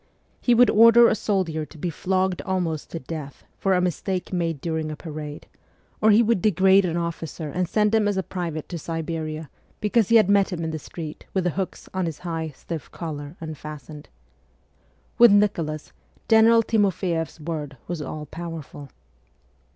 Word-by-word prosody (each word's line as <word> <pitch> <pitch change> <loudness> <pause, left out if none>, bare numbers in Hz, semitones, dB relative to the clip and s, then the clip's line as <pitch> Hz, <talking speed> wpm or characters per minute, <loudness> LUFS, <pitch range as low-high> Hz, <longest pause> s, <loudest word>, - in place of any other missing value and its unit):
He 245 - +4
would 245 +1 +6
order 230 +2 +8
a - - +3
soldier 190 -7 -1
to 160 - -12
be 170 +3 -3
flogged 185 +2 0
almost 175 -5 -2
to - - -5
death 145 0 -7 0.2
for 195 -1 +2
a - - +3
mistake 180 +2 -2
made 165 -4 -1
during 160 0 -2
a 155 - -4
parade, 150 -2 -7 0.6
or 220 - +5
he 215 +2 +6
would 225 -4 +1
degrade 190 0 +4
an 170 -1 -1
officer 165 -2 -4
and 180 +3 -2
send 210 0 +2
him 220 -2 +3
as 205 -1 0
a 190 - 0
private 170 -4 -4
to 175 - -4
Siberia 160 -1 -4 0.3
because 210 0 +2
he 230 - +5
had 215 -4 +6
met 200 0 +3
him 170 -2 -3
in 160 - -2
the 155 - -4
street 155 0 -8
with 190 - +2
the 175 - +1
hooks 190 +3 -4
on 185 -2 -1
his 160 -2 -5
high, 165 -2 -4
stiff 155 +1 -8
collar 150 -1 -6
unfastened. 150 -2 -8 1.1
With 240 -2 +9
Nicholas 170 -7 +1 0.3
General 230 0 +6
Timof 205 -4 +1
Jeff's 165 -4 -2
word 150 -3 -5
was 175 -3 -4
all 150 +1 -5
powerful. 160 -3 -8
170 Hz, 175 wpm, -24 LUFS, 155-195 Hz, 1.1 s, With